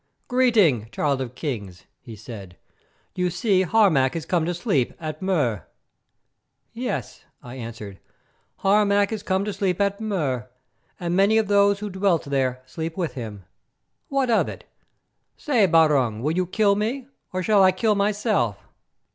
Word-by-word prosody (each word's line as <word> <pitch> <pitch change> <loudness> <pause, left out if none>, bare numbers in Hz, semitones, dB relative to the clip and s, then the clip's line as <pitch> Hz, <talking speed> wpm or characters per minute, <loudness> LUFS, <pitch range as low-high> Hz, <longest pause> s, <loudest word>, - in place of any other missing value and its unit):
"Greeting, 210 - +3
Child 140 +2 0
of 125 -1 -6
Kings," 100 - -5
he 115 - -11
said. 100 -4 -10 0.6
"You 180 0 0
see 185 +2 +1
Harmac 180 -9 +3
is 165 - -4
come 170 -3 0
to 175 - -1
sleep 165 - 0
at 155 -2 -6
Mur." 140 - 0 1.1
"Yes," - - -4 0.2
I 120 - -9
answered, 110 -5 -8 0.6
"Harmac 200 +1 +3
is 220 - -3
come 190 +1 -1
to 210 - -3
sleep 190 -1 -1
at 200 +1 0
Mur, 145 - -2 0.5
and 175 0 -2
many 200 +3 +4
of 220 -2 +2
those 200 0 +3
who 210 -1 -4
dwelt 190 -3 +1
there 130 -2 -1
sleep 160 +5 -6
with 175 -4 -2
him. 110 - -7 0.6
What 270 -3 0
of 225 - +2
it? - - -9 0.7
Say, 240 -9 +2
Barung, 140 -9 +3
will 150 - +1
you 180 0 0
kill 205 +2 +2
me, 235 +6 -2 0.3
or 185 0 -2
shall 210 +1 +4
I 190 -1 +6
kill 210 +4 +1
myself?" 205 - 0
180 Hz, 155 wpm, -23 LUFS, 130-205 Hz, 1.1 s, I